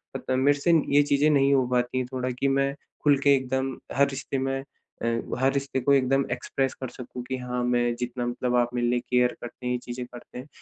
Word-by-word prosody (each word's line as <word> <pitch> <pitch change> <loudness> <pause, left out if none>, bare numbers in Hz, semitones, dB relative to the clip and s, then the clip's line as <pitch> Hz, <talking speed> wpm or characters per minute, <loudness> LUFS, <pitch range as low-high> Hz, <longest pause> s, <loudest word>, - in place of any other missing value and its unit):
अ, - - +1
त - - -13
मेरे 140 +2 +3
से 170 +3 +3
न 160 - +4
ये 145 0 +6
चीज़ें 145 +1 +3
नहीं 140 -1 +4
हो 130 -2 +3
पाती 125 +1 +1
है 130 - -1
थोड़ा 130 0 -1
कि 140 - +2
मैं 140 0 +1 0.3
खुल 145 -2 +5
के 140 - +7
एकदम 130 0 -2 0.2
हर 140 0 +4
रिश्ते 135 0 -4
में 135 0 -2 0.4
अ, - - 0 0.3
हर 135 +1 +3
रिश्ते 140 -1 -1
को 140 +3 +3
एकदम 135 0 +3
एक्सप्रेस 135 -1 -1
कर 130 - -3
सकूँ 125 0 -8
कि 130 +1 -4
हाँ, 125 0 -3
मैं 120 -1 +1
जितना 125 0 -3
मतलब 125 0 -1
आप 120 0 +2
मेरे 120 -1 +1
लिए 120 0 +2
केयर 125 0 +3
करते 120 +1 -9
हैं 125 - 0
ये - - 0
चीज़ें 125 0 -5
करते 120 0 -12
हैं, 130 - -8
130 Hz, 245 wpm, -26 LUFS, 125-140 Hz, 0.4 s, के